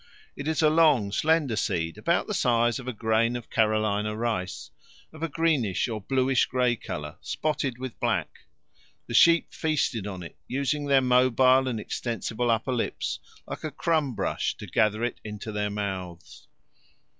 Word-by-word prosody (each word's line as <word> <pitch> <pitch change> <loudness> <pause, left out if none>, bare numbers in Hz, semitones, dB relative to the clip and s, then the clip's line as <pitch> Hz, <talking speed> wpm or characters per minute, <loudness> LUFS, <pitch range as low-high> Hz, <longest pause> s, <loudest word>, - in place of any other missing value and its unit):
It 140 - -6
is 160 0 +1
a 155 - +6
long, 150 -11 +4
slender 155 -1 +2
seed, 85 -5 -1
about 115 +12 +1
the 210 - -4
size 120 - +2
of 130 - -9
a - - -1
grain 115 +1 +1
of 120 -2 -7
Carolina 105 -1 +1
rice, 110 -6 -3 0.4
of 160 - -12
a 165 - -1
greenish 145 - +1
or 110 -3 -4
bluish 130 +3 +2
grey 125 -1 +1
colour, 75 -7 -7
spotted 150 -5 -2
with 130 -2 -7
black. - - -2 0.6
The - - -7
sheep 170 +7 +5
feasted 135 -9 -1
on 95 -3 -6
it, 85 - -11
using 140 +2 -1
their 135 -1 +5
mobile 130 +1 +4
and 120 -4 -2
extensible 120 +2 -3
upper 115 +3 +1
lips 120 - -2 0.3
like - - -7
a 155 - -2
crumb 150 -3 0
brush - - -1
to - - -8
gather 110 +1 +1
it 120 - -3
into 105 0 -6
their 105 0 -1
mouths. 95 -4 -6
120 Hz, 165 wpm, -26 LUFS, 105-140 Hz, 0.6 s, a